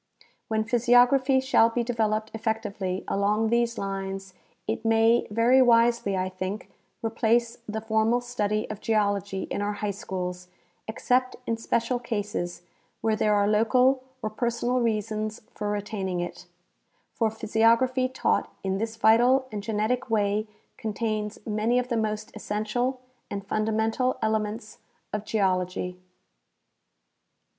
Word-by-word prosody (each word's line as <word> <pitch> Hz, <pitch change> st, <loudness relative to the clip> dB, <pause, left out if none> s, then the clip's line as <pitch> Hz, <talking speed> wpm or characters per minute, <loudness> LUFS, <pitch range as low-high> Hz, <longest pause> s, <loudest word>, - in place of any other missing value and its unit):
When 220 Hz, -1 st, 0 dB
physiography 245 Hz, +3 st, +4 dB
shall 260 Hz, -3 st, +4 dB
be 235 Hz, +1 st, -1 dB
developed 220 Hz, -2 st, -1 dB
effectively 210 Hz, -4 st, -2 dB
along 210 Hz, +3 st, +1 dB
these 235 Hz, 0 st, +1 dB
lines, 195 Hz, -1 st, -4 dB, 0.3 s
it 220 Hz, -, -3 dB
may 225 Hz, +1 st, +3 dB
very 235 Hz, +5 st, +4 dB
wisely, 235 Hz, -4 st, +4 dB
I 185 Hz, 0 st, 0 dB
think, 185 Hz, +5 st, -5 dB, 0.3 s
replace 230 Hz, +1 st, +1 dB
the 220 Hz, +1 st, -3 dB
formal 220 Hz, +2 st, +2 dB
study 215 Hz, -4 st, -1 dB
of 205 Hz, -, -7 dB
geology 200 Hz, -3 st, 0 dB
in -, -, -1 dB
our 205 Hz, 0 st, -1 dB
high 205 Hz, 0 st, -2 dB
schools 180 Hz, -2 st, -5 dB, 0.4 s
except 250 Hz, +3 st, +1 dB
in 230 Hz, -, 0 dB
special 230 Hz, +2 st, 0 dB
cases 205 Hz, -7 st, -3 dB, 0.4 s
where 220 Hz, -1 st, +2 dB
there 210 Hz, 0 st, +2 dB
are 205 Hz, 0 st, +3 dB
local 250 Hz, +5 st, +3 dB, 0.2 s
or 215 Hz, -, -2 dB
personal 240 Hz, +2 st, 0 dB
reasons 215 Hz, -2 st, -2 dB
for 210 Hz, 0 st, -3 dB
retaining 205 Hz, -3 st, -2 dB
it, 175 Hz, -, -6 dB, 0.7 s
for 225 Hz, -2 st, +1 dB
physiography 230 Hz, +4 st, +2 dB
taught 260 Hz, -, 0 dB
in 190 Hz, 0 st, -1 dB
this 225 Hz, +1 st, -3 dB
vital 240 Hz, +4 st, +4 dB
and 210 Hz, -1 st, -4 dB
genetic 220 Hz, +4 st, -1 dB
wa}^ 215 Hz, -2 st, 0 dB, 0.3 s
contains 215 Hz, -1 st, -2 dB
many 220 Hz, +3 st, +1 dB
of 250 Hz, 0 st, 0 dB
the 235 Hz, -, 0 dB
most 215 Hz, 0 st, -2 dB
essential 245 Hz, +5 st, -2 dB, 0.3 s
and 200 Hz, 0 st, -5 dB
fundamental 220 Hz, +4 st, 0 dB
elements 220 Hz, 0 st, -2 dB, 0.3 s
of 210 Hz, 0 st, -3 dB
geology. 185 Hz, -3 st, -1 dB
220 Hz, 130 wpm, -26 LUFS, 205-235 Hz, 0.7 s, physiography